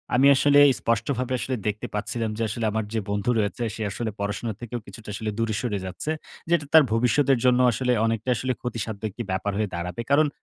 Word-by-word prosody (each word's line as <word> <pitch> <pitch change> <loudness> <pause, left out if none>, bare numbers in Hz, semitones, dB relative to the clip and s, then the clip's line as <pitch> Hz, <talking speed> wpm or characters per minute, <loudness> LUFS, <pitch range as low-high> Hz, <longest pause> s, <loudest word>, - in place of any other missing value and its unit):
আমি 135 +3 +6
আসলে 145 +1 +5 0.2
স্পষ্টভাবে 125 +3 -1
আসলে 130 - -2
দেখতে 105 0 -2
পাচ্ছিলাম 110 +2 -2
যে 115 - -1
আসলে 115 +2 -2
আমার 110 0 -1
যে 115 - +1
বন্ধু 100 +3 -1
রয়েছে 105 +2 -1
সে 110 - -7
আসলে 110 +2 -3
পড়াশোনা 105 +2 -2
থেকেও 120 0 -4
কিছুটা 105 +2 -11
আসলে 110 +2 -3
দূরে 115 -2 0
সরে 115 -5 -1
যাচ্ছে। 95 +11 -4 0.4
যেটা 170 -3 +2
তার 160 - +9
ভবিষ্যতের 130 +4 +3
জন্য 125 0 +5
আসলে 125 +2 0
অনেকটা 115 +2 -1
আসলে 130 +3 -1
ক্ষতিসাধ্যক 110 -3 -4
একটি 120 +5 -6
ব্যাপার 95 +2 -1
হয়ে 105 -2 0
দাঁড়াবে। 90 +4 -4
কারণ 150 +2 +5
115 Hz, 195 wpm, -25 LUFS, 105-125 Hz, 0.4 s, তার